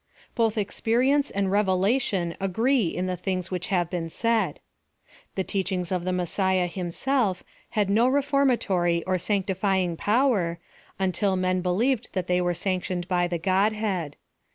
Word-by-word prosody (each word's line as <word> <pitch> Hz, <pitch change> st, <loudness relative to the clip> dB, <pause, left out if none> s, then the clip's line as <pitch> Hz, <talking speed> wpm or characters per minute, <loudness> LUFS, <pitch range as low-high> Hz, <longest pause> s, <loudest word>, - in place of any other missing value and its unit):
Both 225 Hz, -1 st, +1 dB
experience 250 Hz, +7 st, +1 dB
and 195 Hz, -1 st, -1 dB
revelation 195 Hz, -2 st, +1 dB
agree 220 Hz, +4 st, +1 dB
in 180 Hz, +2 st, -2 dB
the 185 Hz, 0 st, -1 dB
things 185 Hz, 0 st, -3 dB
which 180 Hz, -1 st, -3 dB
have 175 Hz, -3 st, +1 dB
been 170 Hz, -2 st, -4 dB
said. 220 Hz, -4 st, 0 dB, 0.8 s
The 190 Hz, -, 0 dB
teachings 185 Hz, -2 st, -2 dB
of 180 Hz, -1 st, -1 dB
the 185 Hz, -, 0 dB
Messiah 185 Hz, +1 st, +1 dB
himself 185 Hz, +4 st, -1 dB, 0.3 s
had 205 Hz, -2 st, +3 dB
no 220 Hz, +5 st, +3 dB
reformatory 255 Hz, -, +2 dB
or 185 Hz, -1 st, 0 dB
sancti 195 Hz, +1 st, 0 dB
fying 190 Hz, -2 st, 0 dB
power, 210 Hz, -7 st, +2 dB, 0.4 s
until 190 Hz, +1 st, +1 dB
men 185 Hz, 0 st, 0 dB
believed 220 Hz, +7 st, 0 dB
that 185 Hz, -3 st, -1 dB
they 180 Hz, 0 st, +1 dB
were 175 Hz, 0 st, 0 dB
sanctioned 180 Hz, 0 st, -2 dB
by 175 Hz, -2 st, +1 dB
the 175 Hz, -1 st, -2 dB
Godhead. 190 Hz, -3 st, 0 dB
190 Hz, 145 wpm, -25 LUFS, 180-215 Hz, 0.8 s, had